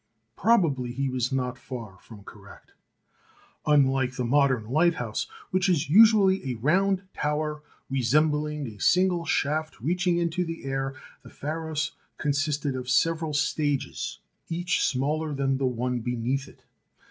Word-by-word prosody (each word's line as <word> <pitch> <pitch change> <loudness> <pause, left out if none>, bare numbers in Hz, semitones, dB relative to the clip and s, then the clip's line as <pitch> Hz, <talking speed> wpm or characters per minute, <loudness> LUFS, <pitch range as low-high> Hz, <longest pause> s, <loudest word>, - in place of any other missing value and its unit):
Probably 160 - +2
he 135 +1 -1
was 130 0 -1
not 125 -1 -2
far 115 -9 -8
from 105 -3 -14
correct. 100 0 -14 1.0
Unlike 135 -3 +3
the 125 - -2
modern 130 -3 +2
lighthouse, 135 -5 +1 0.2
which 185 0 +2
is 165 -4 +1
usually 205 -1 +6
a 125 - -2
round 185 - +2
tower 150 0 -2 0.3
resembling 150 +3 +1
a 110 -4 -9
single 180 - +3
shaft 155 +1 -1
reaching 175 - +1
into 170 +1 0
the 165 -1 -6
air, 135 0 -2 0.3
the - - -14
Pharos 155 0 -3 0.3
consisted 145 -1 -1
of 125 -1 -5
several 160 +2 +1
stages, 145 -1 -1 0.3
each 175 +2 0
smaller 150 +3 0
than 135 -1 0
the 135 - +1
one 125 0 -1
beneath 125 +3 -2
it. - - -18
145 Hz, 135 wpm, -26 LUFS, 130-165 Hz, 1.0 s, usually